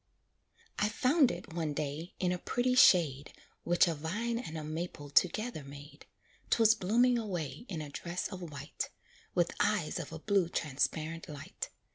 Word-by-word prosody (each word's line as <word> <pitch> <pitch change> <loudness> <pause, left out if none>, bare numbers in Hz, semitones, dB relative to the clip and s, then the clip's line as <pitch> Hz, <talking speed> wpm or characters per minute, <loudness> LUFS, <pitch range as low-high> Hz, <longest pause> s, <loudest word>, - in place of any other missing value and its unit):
I 210 - +2
found 260 +5 +4
it, 170 - -6
one 160 -3 -1
day, 150 +4 -4
in 180 -1 +1
a 180 - -2
pretty 250 +6 0
shade 160 - +5 0.3
Which 175 +1 +4
a 170 - +1
vine 210 +10 -2
and 165 -10 -6
a 155 - -5
maple 155 -2 -5
together 200 +1 +2
made; 140 +1 -12 0.4
'Twas 225 -1 +6
blooming 235 +4 +3
away 190 - -4
in 165 -5 -3
a 145 - -8
dress 175 +4 -3
of 185 -2 -7
white, 150 -6 -5 0.5
With - - +2
eyes - - +1
of - - -6
a - - -5
blue 195 -5 +1
transparent 155 +1 -2
light. 145 -1 -6
175 Hz, 160 wpm, -32 LUFS, 155-215 Hz, 0.5 s, Twas